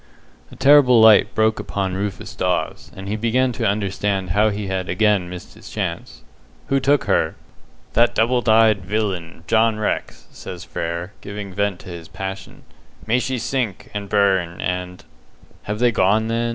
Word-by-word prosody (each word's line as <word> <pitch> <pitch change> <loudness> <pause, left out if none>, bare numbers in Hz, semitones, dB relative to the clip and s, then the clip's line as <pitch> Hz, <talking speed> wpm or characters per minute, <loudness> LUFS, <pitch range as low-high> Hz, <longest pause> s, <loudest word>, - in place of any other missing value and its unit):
A - - -12
terrible 135 -3 +6
light 110 -2 +6
broke 110 0 +2
upon 95 -2 -3
Rufus 100 +1 -4
Dawes, 90 -3 -2
and 95 0 -8
he 105 - -2
began 120 +4 +1
to 115 - -1
understand 100 -2 -1
how 105 +3 +3
he 105 0 -4
had 95 -1 -3
again 100 -1 +2
missed 90 0 -9
his - - -13
chance. - - -5 0.5
"Who 135 - +3
took 140 +2 +2
her?" 95 -5 +1 0.6
"That 120 +1 +3
double 120 +2 +2
dyed 110 -3 +4
villain, 90 -5 -3
John 110 -1 +2
Rex," 110 - -3
says - - -9
Frere, 85 +3 -4
giving 100 -1 -7
vent 100 -1 -1
to - - -11
his 85 -2 -8
passion. 95 0 -7 0.4
"May 120 +3 +2
she 130 +1 -2
sink, 120 -5 -3
and 100 -1 -5
burn, 95 -4 +1
and 90 0 -4 0.3
" - - -28
"Have 105 +1 -3
they 120 +1 +3
gone, 110 +2 +2
then?" 115 +1 0
105 Hz, 165 wpm, -21 LUFS, 95-110 Hz, 0.6 s, terrible